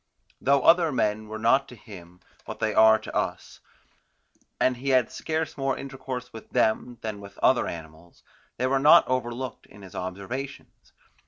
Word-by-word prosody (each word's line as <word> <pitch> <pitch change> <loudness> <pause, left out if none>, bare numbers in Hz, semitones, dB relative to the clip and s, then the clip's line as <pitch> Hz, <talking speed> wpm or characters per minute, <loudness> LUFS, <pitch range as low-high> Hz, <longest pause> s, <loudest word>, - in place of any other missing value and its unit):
Though 140 0 +3
other 165 -1 +5
men 110 -4 -1
were 110 +1 -6
not 115 +5 +2
to 125 - -12
him 90 -6 -14 0.2
what - - -8
they 110 -1 0
are 110 0 +6
to 110 - -10
us, - - -3 1.0
and 130 -1 +2
he 135 +3 -4
had 130 -3 +3
scarce 160 -1 -3
more 135 -1 0
intercourse 130 -2 -7
with 110 - -11
them 120 +2 0
than 110 -2 -5
with 100 0 -12
other 130 - +3
animals, 80 +1 -10 0.3
they 125 - 0
were 135 +1 +2
not 150 +5 +7
overlooked 125 0 -3
in 100 0 -15
his 95 - -12
observations. 100 +9 -7
120 Hz, 165 wpm, -26 LUFS, 105-135 Hz, 1.0 s, not